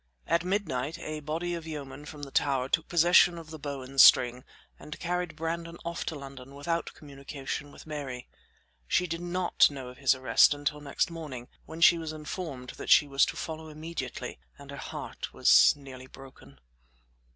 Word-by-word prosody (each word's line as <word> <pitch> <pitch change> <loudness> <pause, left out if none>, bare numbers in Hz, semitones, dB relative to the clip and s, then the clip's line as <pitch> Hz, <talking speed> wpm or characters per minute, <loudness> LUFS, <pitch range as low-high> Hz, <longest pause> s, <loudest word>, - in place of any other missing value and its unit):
At 170 0 +1
midnight 165 -6 -2
a 155 -2 -5
body 160 +4 -3
of 165 -1 -6
yeomen 145 -2 -7
from 150 -1 -10
the 140 - -7
tower 135 -3 +1
took 160 - +1
possession 175 +1 +5
of 160 -1 -10
the 155 - -8
Bow 140 -2 -5
and 135 +1 +3
String, 125 0 +6 0.4
and 150 - -9
carried 175 -1 -2
Brandon 165 +1 -4
off 170 0 -4
to 160 - -2
London 135 -1 -10
without 165 +4 -3
communication 140 0 -7
with - - -14
Mary. 140 -5 -6 0.6
She 180 - +2
did, 165 0 -4
not 175 +1 +3
know 135 -3 -7
of 125 - -13
his 135 -1 +4
arrest 130 +2 +4
until 145 +1 -3
next 145 +3 -1
morning, 145 -7 -7 0.2
when 160 +1 -8
she 170 0 +7
was 160 -1 -5
informed 150 -5 -6
that - - -7
she 150 - +7
was 140 -1 +3
to - - -5
follow 160 0 -6
immediately, 155 - -6 0.2
and - - -12
her - - -8
heart - - -7
was - - +6
nearly 130 -2 -11
broken. 135 0 -15
150 Hz, 180 wpm, -29 LUFS, 135-165 Hz, 0.6 s, she